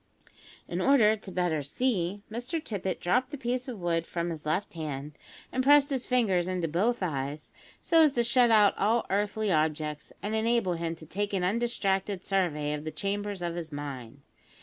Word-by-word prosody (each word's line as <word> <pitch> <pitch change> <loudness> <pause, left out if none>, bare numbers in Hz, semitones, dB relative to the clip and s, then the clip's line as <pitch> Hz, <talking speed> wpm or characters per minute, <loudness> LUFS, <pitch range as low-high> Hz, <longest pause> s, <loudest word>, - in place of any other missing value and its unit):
In - - -3
order 230 -6 +5
the 200 -2 -10
better 175 -3 0
to - - -7
"see," 200 - -1
Mr 245 +9 -3
Tippet 195 - -3
dropt 250 +9 +1
the 290 - -6
piece 250 0 -2
of 240 -5 -6
wood 170 -1 -1
from 170 0 -2
his 155 -2 -7
left 180 +7 -1
hand, 150 -3 -5 0.4
and 260 - 0
pressed 285 +1 +6
his 260 -2 -2
fingers 200 -9 +2
into 180 -2 -1
both 200 +8 0
eyes, 145 -2 -3 0.3
so 330 -1 +5
as 310 -2 +6
to 240 - +2
shut 240 +1 +4
out 210 -3 +5
all 225 +3 +2
earthly 205 +1 0
objects, 155 -1 -1
and 210 +2 -2
enable 220 -4 +1
him 165 0 -3
to 160 - -11
take 205 +5 -3
an 190 -2 0
undistracted 195 -2 0
survey 155 -7 0
of 150 0 -4
the 155 - -3
chambers 200 +1 -3
of 170 -1 -2
his 165 -2 -6
mind. 140 -3 -7
190 Hz, 190 wpm, -28 LUFS, 165-230 Hz, 0.4 s, pressed